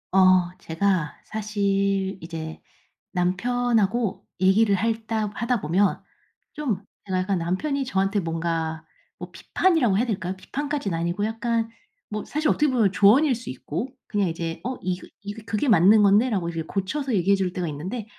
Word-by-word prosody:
어 185 -2 +5
제가 170 -2 0
사실 200 -2 -1
이제 160 -1 -6 0.5
남편하고 225 +3 +1 0.2
얘기를 200 +2 +4
할 225 +2 -1
따 215 -2 -1
하다 235 0 -1
보면 185 +6 +1 0.5
좀 255 - -2 0.2
제가 185 -2 -1
약간 185 0 0
남편이 265 - -1
저한테 195 -3 +1
뭔가 165 -1 -2 0.3
뭐 - - -8
비판이라고 310 - +2
해야 235 - +2
될까요? 190 -5 -2
비판까진 280 - -3
아니고 170 +4 -1
약간 225 +1 -1 0.4
뭐 210 0 -4
사실 305 +1 0
어떻게 300 - +3
보면 225 -7 +3
조언일 250 +9 +5
수 235 +1 -8
있고 155 - -4 0.2
그냥 205 -3 0
이제 165 0 -4
"어 255 +1 -2
이거 180 0 -3
이거 205 +1 -7
그게 215 +6 0
맞는 210 +2 +6
건데."라고 200 -3 +3
이제 165 -1 -3
고쳐서 220 - -2
얘기해 195 +1 +3
줄 185 -2 -1
때가 180 -2 -2
있는데 185 +10 -5
200 Hz, 325 characters per minute, -24 LUFS, 180-225 Hz, 0.5 s, 맞는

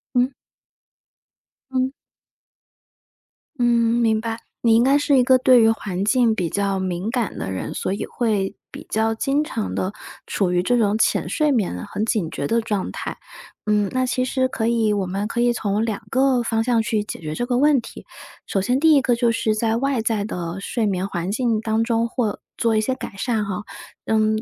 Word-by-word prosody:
嗯。 250 +1 +3 1.4
嗯。 260 0 0 1.7
嗯， 245 - +1
明 230 -2 +2
白。 225 0 -3 0.2
你 230 -1 +4
应 230 - +5
该 275 +2 +4
是 290 -1 +3
一 255 - +5
个 255 +1 +5
对 255 -1 +5
于 225 - +5
环 195 -4 -2
境 230 +1 +3
比 180 -5 -1
较 200 0 0
敏 185 +2 -2
感 235 -3 -2
的 - - -4
人， 95 -1 -4
所 - - -2
以 200 - -3
会 210 -5 -1 0.2
比 - - -9
较 225 +1 +1
经 275 +5 +1
常 235 -9 -3
地 185 +2 -2 0.3
处 190 -3 0
于 175 0 +2
这 245 +7 +1
种 215 -2 +2
浅 - - +1
睡 305 -1 +1
眠， 195 - -1
很 215 - -2
警 210 -7 0
觉 140 - -4
的 230 +9 +2
状 210 -4 -2
态。 - - -5 0.5
嗯， 210 -2 +2
那 255 0 +1
其 255 0 0
实 260 0 +1
可 225 -3 -1
以 230 -2 +2
我 200 -2 0
们 195 +3 -2
可 235 - -3
以 240 0 +3
从 210 -1 -1
2 220 -1 -3
个 260 -1 +2
方 225 -1 0
向 235 -1 +2
去 220 -1 -1
解 - - -7
决 155 -1 -4
这 245 - -1
个 245 0 0
问 290 +1 +4
题。 230 - -10 0.4
首 195 - 0
先 250 +7 +1
第 320 +1 +5
一 285 - +5
个 250 -2 +2
就 235 0 +2
是 220 -1 0
在 225 +1 +1
外 270 -1 0
在 220 -2 0
的 175 -3 -4
睡 220 +3 -2
眠 190 -2 -1
环 180 -1 -3
境 225 -1 0
当 220 0 +1
中 230 0 +1
或 230 -4 -2 0.2
做 230 -1 +1
一 215 - +3
些 255 +4 -1
改 260 - -7
善 220 +1 -1
哈。 200 0 -3 0.5
嗯， 215 0 +2
225 Hz, 215 characters per minute, -22 LUFS, 205-245 Hz, 1.7 s, 应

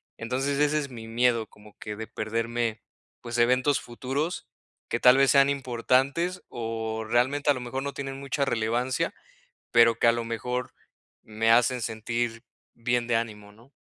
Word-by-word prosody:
entonces 135 +4 -2
ese 150 +1 +3
es 140 -2 -4
mi 115 -3 -9
miedo 115 -1 +2
como 105 0 -18
que 105 -1 -7
de 110 0 -6
perderme, 115 +1 -2 0.4
pues 120 0 -5
eventos 130 +4 +3
futuros. 135 +7 -4 0.4
Que - - -1
tal 125 +1 +7
vez 135 0 +5
sean 140 0 +5
importantes 135 +6 0
o 110 -1 -4
realmente 130 +5 +2
a - - +7
lo 130 - -5
mejor 125 +2 -4
no 140 +1 -4
tienen 135 -1 -5
mucha 140 +1 -1
relevancia, 120 +1 0 0.6
pero 115 -1 +5
que - - +4
a - - +7
lo 115 0 -3
mejor 125 +2 -3 0.5
me 110 +1 -1
hacen 120 +2 +3
sentir 115 +1 -3 0.3
bien 120 0 -1
de 120 - +1
ánimo, 105 -3 -4
¿no? 115 +5 -20
120 Hz, 165 wpm, -27 LUFS, 115-135 Hz, 0.6 s, tal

